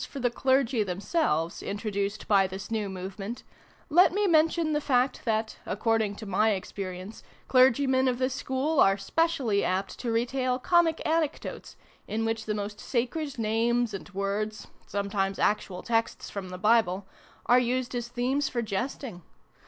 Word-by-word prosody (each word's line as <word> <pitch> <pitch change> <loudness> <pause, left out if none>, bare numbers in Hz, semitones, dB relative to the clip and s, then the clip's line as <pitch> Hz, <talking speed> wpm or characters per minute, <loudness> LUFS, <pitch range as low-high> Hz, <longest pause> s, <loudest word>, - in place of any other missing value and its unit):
for 280 - -7
the 245 -2 +1
Clergy 260 -1 +2
themselves, 180 - -1
introduced 205 0 -3
by 195 -2 +4
this 190 +3 -8
new 215 -3 -1
movement, 195 +4 -6 0.4
let 350 +5 +6
me 410 +3 +1
mention 320 -2 +3
the 295 - +1
fact 255 -1 +1
that, 220 -1 -1
according 220 0 0
to 215 - -8
my 210 +3 +2
experi 185 -1 -6
ence, 200 +4 -10 0.3
Clergymen 260 +1 +4
of 250 -1 +1
this 255 0 0
school 270 +4 -1
are 195 0 +5
specially 255 -2 +1
apt 185 +1 -2
to 240 - -2
retail 250 +2 0
comic 330 +3 +2
anecdotes, 315 -1 -2 0.3
in 225 +1 -1
which 225 0 -2
the 210 - -1
most 205 0 -5
sacred 265 +4 -2
names 230 +1 +1
and 195 - -7
words 205 +2 -3 0.2
sometimes 200 -1 -1
actual 195 -3 0
texts 225 -1 -1
from 195 -2 -5
the 180 - -6
Bible 205 -2 +2 0.4
are 245 +3 +6
used 250 +1 -1
as 240 -1 -3
themes 255 +4 0
for 240 -2 -2
jesting. 215 -1 -4
225 Hz, 155 wpm, -28 LUFS, 200-260 Hz, 0.4 s, let